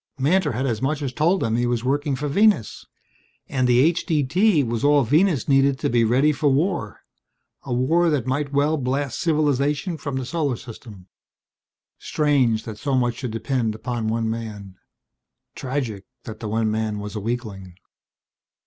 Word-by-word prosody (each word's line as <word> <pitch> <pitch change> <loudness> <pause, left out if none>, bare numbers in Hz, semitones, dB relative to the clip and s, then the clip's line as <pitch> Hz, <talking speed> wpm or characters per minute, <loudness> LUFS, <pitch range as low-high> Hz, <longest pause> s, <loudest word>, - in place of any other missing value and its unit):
Mantor 150 +2 +1
had 130 +4 -2
as 115 -4 -2
much 145 +2 -1
as 130 -2 -3
told 170 +8 +1
them 115 0 0
he 120 0 +1
was 120 -1 -1
working 140 +2 0
for 145 +3 -3
Venus. 200 - +1 0.6
And 130 -2 0
the 120 -1 +4
H.D.T. 165 - +2
was 115 0 -3
all 145 -1 +4
Venus 155 - +2
needed 135 -1 +3
to - - -2
be 120 -1 +3
ready 130 +7 +3
for 145 0 +1
war 140 - -1 0.6
a 135 - -6
war 160 +8 +2
that 145 -6 0
might 140 +2 -2
well 145 +2 +1
blast 135 -1 -2
civilization 150 +1 0
from 140 -3 -5
the 130 -1 -3
Solar 145 -3 -1
System. 110 -5 -12 0.9
Strange 135 -7 +1
that 110 -2 -8
so 140 0 -1
much 120 -2 0
should 125 - -4
depend 115 0 -2
upon 115 0 -4
one 115 0 -1
man; 105 -4 -6 0.8
tragic 125 -7 -4 0.2
that 110 - -8
the 110 - -5
one 110 0 0
man 110 -1 -2
was 105 +1 -6
a - - -2
weakling. 105 -5 -5
130 Hz, 165 wpm, -22 LUFS, 115-145 Hz, 0.9 s, the